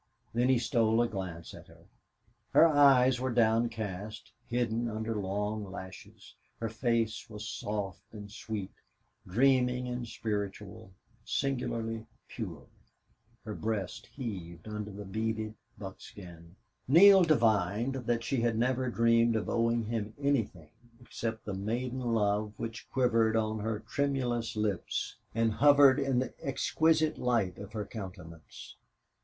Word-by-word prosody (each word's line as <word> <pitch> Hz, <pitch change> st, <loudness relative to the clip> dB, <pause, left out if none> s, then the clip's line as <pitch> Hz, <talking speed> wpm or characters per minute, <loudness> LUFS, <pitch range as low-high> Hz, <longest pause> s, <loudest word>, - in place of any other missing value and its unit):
Then 120 Hz, +2 st, +2 dB
he 130 Hz, -, +5 dB
stole 115 Hz, -2 st, +2 dB
a -, -, +1 dB
glance 95 Hz, -6 st, -6 dB
at -, -, -12 dB
her. -, -, -18 dB, 0.7 s
Her -, -, +8 dB
eyes 135 Hz, -5 st, +5 dB
were 130 Hz, +1 st, -1 dB
downcast, 110 Hz, -3 st, 0 dB, 0.2 s
hidden 120 Hz, -1 st, 0 dB
under 110 Hz, +1 st, -3 dB
long 105 Hz, +1 st, -2 dB
lashes; 95 Hz, -1 st, -10 dB, 0.3 s
her 115 Hz, -, -2 dB
face 115 Hz, 0 st, -1 dB
was 105 Hz, 0 st, -7 dB
soft 100 Hz, -5 st, -5 dB
and 105 Hz, -2 st, -9 dB
sweet, 105 Hz, -2 st, -5 dB, 0.6 s
dreaming 125 Hz, +3 st, +2 dB
and 125 Hz, -1 st, -4 dB
spiritual, 105 Hz, -1 st, -4 dB, 0.3 s
singularly 115 Hz, -4 st, -2 dB, 0.2 s
pure; 90 Hz, -, -7 dB, 0.8 s
her 105 Hz, -, -4 dB
breast 105 Hz, -2 st, -3 dB
heaved 90 Hz, -, -7 dB
under 105 Hz, -1 st, -5 dB
the 100 Hz, 0 st, -8 dB
beaded 110 Hz, +2 st, -2 dB, 0.2 s
buckskin. 90 Hz, -3 st, -11 dB, 0.3 s
Neale 190 Hz, +7 st, +8 dB
divined 115 Hz, -, +2 dB, 0.3 s
she 120 Hz, +1 st, 0 dB
had 115 Hz, -1 st, +1 dB
never 130 Hz, +2 st, +1 dB
dreamed 115 Hz, 0 st, +3 dB
of 110 Hz, -, -1 dB
owing 115 Hz, 0 st, +1 dB
him 110 Hz, -1 st, -3 dB
anything 115 Hz, -, -1 dB, 0.3 s
except 115 Hz, -2 st, -5 dB
the 105 Hz, -, -3 dB
maiden 120 Hz, +6 st, -2 dB
love 105 Hz, -3 st, 0 dB
which 115 Hz, -1 st, -6 dB
quivered 115 Hz, -4 st, +2 dB
on 110 Hz, -1 st, 0 dB
her 105 Hz, 0 st, -2 dB
tremulous 120 Hz, -1 st, -1 dB
lips 105 Hz, -4 st, -2 dB, 0.2 s
and 115 Hz, 0 st, +2 dB
hovered 145 Hz, +1 st, +6 dB
in 135 Hz, -2 st, +1 dB
the 130 Hz, 0 st, -1 dB
exquisite 155 Hz, +3 st, +1 dB
light 115 Hz, -8 st, 0 dB
of 100 Hz, +2 st, -9 dB
her 105 Hz, -2 st, -3 dB
countenance. 90 Hz, -6 st, -10 dB
110 Hz, 125 wpm, -31 LUFS, 105-125 Hz, 0.8 s, Her